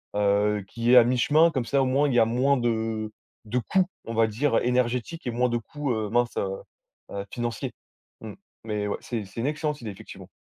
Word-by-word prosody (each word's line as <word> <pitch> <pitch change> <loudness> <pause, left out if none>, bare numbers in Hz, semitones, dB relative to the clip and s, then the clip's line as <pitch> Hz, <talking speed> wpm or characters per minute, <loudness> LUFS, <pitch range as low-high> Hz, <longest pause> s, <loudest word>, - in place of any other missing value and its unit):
heu, 105 0 +2
qui 115 +3 0
est - - +8
à 120 - +9
mi-chemin 145 +7 +4
comme 130 -5 -1
ça 135 +4 +2
au - - +2
moins 140 +3 +2
il - - -1
y - - +6
a 115 - +6
moins 130 +5 +2
de 110 -2 -1 0.3
de 110 +4 -2
coûts 185 +9 +1 0.2
on 115 - -5
va 115 0 +3
dire 115 +4 +1
énergétiques 125 +6 -1
et - - 0
moins 125 +2 +1
de 120 - 0
coûts, 145 +4 -4
heu, 110 -2 -2
mince, 120 +2 +1
heu, 95 - 0 0.6
heu, 100 0 -4
financiers. 120 -3 -3 0.5
Mmh, 110 - -8 0.3
mais 105 -2 -2
ouais, - - -1
c'est 115 -4 -4
c'est 100 +3 -13
une 120 - 0
excellente 150 0 -2
idée 115 -3 -5
effectivement. 100 - -11
120 Hz, 220 wpm, -26 LUFS, 110-130 Hz, 0.6 s, à